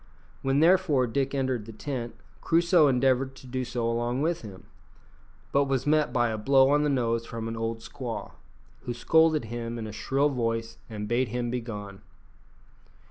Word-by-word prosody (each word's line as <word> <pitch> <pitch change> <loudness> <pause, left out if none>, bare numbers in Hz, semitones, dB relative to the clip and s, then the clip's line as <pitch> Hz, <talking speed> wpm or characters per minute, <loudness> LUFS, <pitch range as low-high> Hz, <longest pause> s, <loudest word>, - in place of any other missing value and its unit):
When 135 +2 +2
therefore 165 -6 +4
Dick 135 +3 -1
entered 130 -5 -1
the - - -7
tent, 120 +1 -5 0.3
Crusoe 170 -1 +4
endeavoured 130 0 +2
to 135 - -14
do 130 0 -3
so 120 -1 -2
along 120 +3 -1
with 165 +1 0
him; 100 -4 -10 0.9
but 140 0 +3
he - - -7
was 135 -1 0
met 150 0 +2
by 120 -1 +2
a 110 -1 -3
blow 135 +4 +4
on 145 0 +4
the 150 - +1
nose 115 -4 0
from 115 0 -5
an 115 - -4
old 115 0 -3
squaw, 125 -3 -6 0.5
who 120 - -3
scolded 160 0 +3
him 115 +1 -5
in 115 - -5
a 110 - -6
shrill 135 +7 +1
voice 115 -3 -2
and 105 -2 -5
bade 120 +3 +1
him 120 +1 -3
begone. 105 -5 -6
125 Hz, 180 wpm, -27 LUFS, 115-140 Hz, 0.9 s, therefore